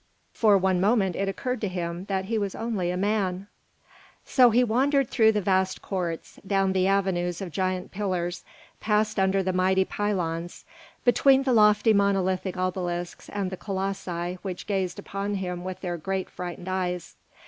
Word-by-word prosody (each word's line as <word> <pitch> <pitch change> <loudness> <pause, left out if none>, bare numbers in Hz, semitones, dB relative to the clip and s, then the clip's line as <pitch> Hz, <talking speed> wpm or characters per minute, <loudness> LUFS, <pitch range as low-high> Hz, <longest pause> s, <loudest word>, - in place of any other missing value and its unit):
For 210 -3 +4
one 190 -1 +1
moment 195 -3 +2
it 195 0 -1
occurred 250 +6 -3
to 210 - 0
him 175 -1 -4
that 190 -1 -2
he 220 +2 -1
was 200 -2 -3
only 215 -6 -2
a 180 - -1
man. 195 -2 0 0.8
So 250 -3 +5
he 240 +2 +4
wandered 265 +3 +2
through 220 -1 +4
the 210 - 0
vast 190 0 +1
courts, 175 -4 -4
down 195 -1 +2
the 185 0 +2
avenues 185 -3 0
of 190 -3 -5
giant 185 +1 -2
pillars, 180 -3 -2 0.4
passed 215 -1 +1
under 190 0 +2
the 185 0 -1
mighty 190 +1 +3
pylons, 175 -5 -3 0.4
between 270 +2 +5
the 260 -2 +1
lofty 210 0 +5
monolithic 190 -2 +1
obelisks 180 -1 -3
and 200 -2 -3
the 185 - -5
colossi 185 -3 -3
which 185 -3 -5
gazed 190 -3 -1
upon 200 +1 -4
him 180 -2 -4
with 185 0 -6
their 175 -2 -3
great, 190 +3 -3
frightened 180 0 -7
eyes. 180 -2 -3
190 Hz, 165 wpm, -26 LUFS, 180-205 Hz, 0.8 s, So